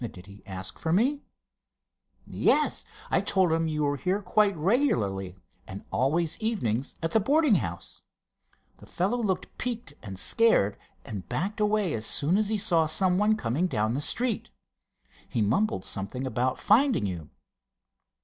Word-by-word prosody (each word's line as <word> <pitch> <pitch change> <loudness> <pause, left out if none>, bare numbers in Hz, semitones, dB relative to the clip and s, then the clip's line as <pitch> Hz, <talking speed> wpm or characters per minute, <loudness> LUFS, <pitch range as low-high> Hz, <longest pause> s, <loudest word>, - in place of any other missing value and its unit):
"Did 100 -6 -7
he 100 +1 -14
ask 95 -1 -6
for 160 - -2
me?" 260 - +2 1.0
"Yes. - - +1 0.3
I - - +3
told 185 -3 +2
him 165 0 +1
you 155 -1 -1
were 145 0 0
here 185 +8 0
quite 200 0 +2
regularly, 105 - 0 0.3
and 95 +1 -8
always 160 +5 0
evenings 140 - -1
at 165 - 0
the 220 - +4
boarding 285 +4 +3
house. 85 -3 -6 0.8
The - - -15
fellow 200 +8 -1
looked 195 -5 -2
peaked 240 -2 -4
and 95 -2 -8
scared, 105 - +2 0.3
and 100 -4 -7
backed 200 +7 -2
away 210 -4 +1
as 110 0 -2
soon 155 +6 +1
as 210 -1 +1
he 220 - +1
saw 175 -6 +2
someone 190 +6 +2
coming 135 - 0
down 110 -7 0
the 140 - -2
street. 230 +8 -1 0.8
He 115 - 0
mumbled 115 - 0
something 115 +7 -3
about 130 +1 -1
finding 235 - +3
you." 85 -5 -5
165 Hz, 150 wpm, -27 LUFS, -, 1.0 s, the